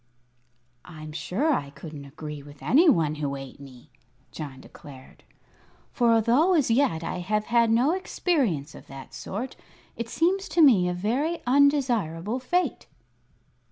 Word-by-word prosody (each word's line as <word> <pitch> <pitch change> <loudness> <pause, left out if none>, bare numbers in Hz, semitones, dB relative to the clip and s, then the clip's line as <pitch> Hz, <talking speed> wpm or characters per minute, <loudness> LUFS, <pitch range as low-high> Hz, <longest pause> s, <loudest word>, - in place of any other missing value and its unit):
"I'm 155 -3 -10
sure 220 - -1
I 140 - -2
couldn't 145 0 -10
agree 150 +1 -8
with 145 0 -14
any 320 +7 +5
one 160 - +2
who 140 -1 -2
ate 135 0 -9
me," 130 -3 -14 0.4
John 140 -4 -8
declared. 135 -1 -14 0.7
"For, 240 -2 +2
although 245 - +3
as 285 -7 +2
yet 225 - +2
I 175 +2 -4
have 210 +4 -1
had 235 -1 +3
no 240 +7 +3
experience 265 - -1
of - - -13
that 135 -1 -11
sort, 235 +7 -6 0.4
it 235 -1 -5
seems 375 +7 0
to 340 - +2
me 200 -11 +5
a - - -1
very 260 - -1
undesirable 245 - +1
fate." 350 +8 -1
215 Hz, 145 wpm, -26 LUFS, -, 0.7 s, any